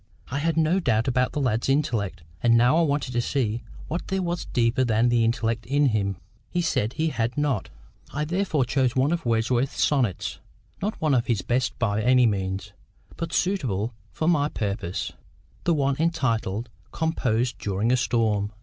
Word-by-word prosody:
I 140 - -1
had 165 +1 0
no 165 +4 +3
doubt 115 - +1
about 125 0 +2
the - - -1
lad's 120 -3 0
intellect, 110 - 0 0.2
and 115 -1 +5
now 125 +5 +5
I 170 - +4
wanted 145 -4 0
to 120 -1 +1
see 120 -3 -1 0.3
what 170 - -4
there 190 0 -1
was 175 0 -2
deeper 120 +2 +1
than 115 0 +3
the 120 -1 +3
intellect 115 0 0
in 140 +1 +3
him. 100 -4 0 0.3
He 175 - -1
said 115 -8 0
he 160 0 0
had 115 -2 -2
not. 140 -9 0 0.4
I 150 +2 -2
therefore 170 -5 0
chose 130 -1 +1
one 130 +3 +2
of 170 -6 -1
Wordsworth's 120 +3 +1
sonnets, 125 - 0 0.4
not 210 +3 -2
one 155 -2 +2
of 120 -2 +2
his 115 -6 0
best 125 +2 0
by 105 -2 0
any 125 +2 +5
means, 100 -2 -1 0.4
but 165 -1 -4
suitable 125 - 0 0.2
for 160 - -2
my 150 -4 +3
purpose—the 95 - -4
one 140 -2 +1
entitled, 120 - 0 0.2
"Composed 125 -7 0
during 100 +4 0
a 130 - +4
Storm." 110 -4 +1
125 Hz, 175 wpm, -25 LUFS, 110-150 Hz, 0.4 s, and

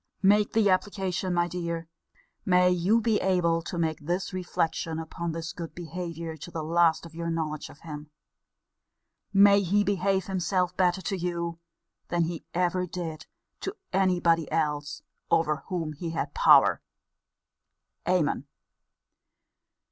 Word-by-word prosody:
Make 205 +2 +4
the 220 -2 +4
application, 190 -1 0
my 175 -1 +2
dear: 170 -1 -4 0.6
may 180 -1 +4
you 180 +6 +3
be 220 -1 +2
able 170 -3 +2
to 175 - -6
make 160 -2 0
this 175 +4 -2
reflection 165 -3 -1
upon 165 +1 -4
his 165 0 -5
good 170 -2 -7
behaviour 170 -1 -5
to 155 - -9
the 165 -2 -4
last 165 +1 +3
of 165 - -12
your 170 0 -4
knowledge 155 -2 -3
of 145 - -15
him! 150 -2 -8 1.2
May 200 0 +6
he 200 +2 +2
behave 195 -1 +1
himself 185 -1 0
better 185 0 +2
to 195 - -1
you, 170 -2 -3 0.5
than 175 -1 +1
he 165 0 -4
ever 180 +1 +1
did 165 -3 -6 0.3
to 390 - -4 0.2
any 185 -1 +3
body 165 -3 +2
else 150 -2 -1 0.3
over 155 -2 +2
whom 165 -4 -3
he 165 +3 -5
had 165 0 -3
power! - - +6 1.3
Amen! 160 -6 +1
175 Hz, 140 wpm, -27 LUFS, 165-185 Hz, 1.3 s, May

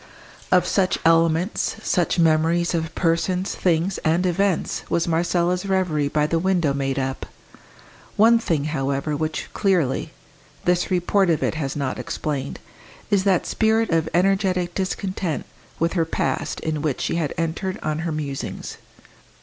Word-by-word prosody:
Of 180 -1 +5
such 190 -1 +1
elements, 165 +3 +2
such 175 -1 +1
memories 165 +1 +3
of 160 -1 -2
persons, 180 +2 0
things, 175 +2 0
and 165 +3 +1
events, 185 0 0
was 170 - +1
Marcella's 175 +2 +1
reverie 180 -7 +1
by 150 +1 +1
the 165 +2 0
window 175 -5 +1
made 135 -1 -1
up. 135 0 -3 0.9
One 230 +2 +6
thing, 165 -10 0
however, 140 0 -1
which, 155 +1 -3
clearly, 180 -10 +1 0.5
this 180 0 +2
report 185 +1 +2
of 160 - +1
it - - +1
has 140 -4 -3
not 140 -3 -2
explained, 140 -3 -3 0.5
is 200 -1 +3
that 190 -3 +3
spirit 220 0 +1
of 160 -1 +1
energetic 185 -1 +1
discontent 185 -3 -2 0.3
with 165 +1 0
her 170 -3 +1
past 160 -1 -2
in 155 -2 -2
which 150 -4 -1
she - - -1
had 155 -4 -1
entered 165 +4 -2
on 155 0 -1
her 165 0 -2
musings. 145 -3 -5
165 Hz, 145 wpm, -23 LUFS, 155-185 Hz, 0.9 s, One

